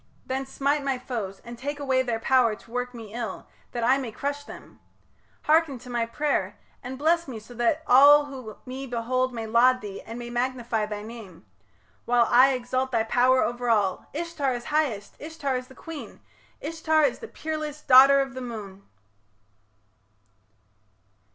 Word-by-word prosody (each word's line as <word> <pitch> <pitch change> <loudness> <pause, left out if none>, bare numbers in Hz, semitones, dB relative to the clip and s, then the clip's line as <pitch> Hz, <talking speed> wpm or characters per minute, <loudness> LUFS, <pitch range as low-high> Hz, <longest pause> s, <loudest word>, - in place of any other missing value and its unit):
Then 265 +1 -3
smite 280 +2 0
my 270 -2 0
foes, 220 -7 -5
And 235 0 -9
take 290 +2 -4
away 265 -2 +1
their 240 -3 -1
power 245 -3 +3
to 225 - -19
work 250 0 -3
me 220 -3 -10
ill, 230 -5 -5 0.3
That 240 -1 -3
I 260 +3 +4
may 250 -4 -5
crush 285 +5 -4
them. - - -12 0.6
Hearken 310 -3 +3
to 245 +1 -11
my 235 -1 0
pray'r! 230 -7 -1 0.3
And 260 +1 -7
bless 330 +3 +2
me 250 -4 -6
so 220 +3 -12
that 240 +7 0
all 290 +3 +7
who 255 -7 -9
me 265 +1 -6
behold 255 +2 -1
May 230 -2 -5
laud 250 +3 +4
thee 200 -2 -7
and 225 +1 -9
may 240 0 -7
magnify 240 -3 -1
thy 210 -1 -5
name, 210 -6 -11 0.6
While 240 0 +4
I 260 +3 +6
exalt 255 +1 -2
thy 230 -3 +2
power 255 +3 +3
over 240 0 -2
all 205 -5 +1
Ishtar 300 -4 -2
is 240 0 -7
highest! 240 -10 -1
Ishtar 300 -4 -3
is 250 0 -4
the 265 - -16
queen! 325 -3 -9 0.4
Ishtar 315 0 +2
the 455 - -10
peerless 310 -4 -5
daughter 270 +2 +8
of 270 -1 -4
the 260 - -6
moon! 210 -5 -7
255 Hz, 170 wpm, -26 LUFS, 230-280 Hz, 0.6 s, daughter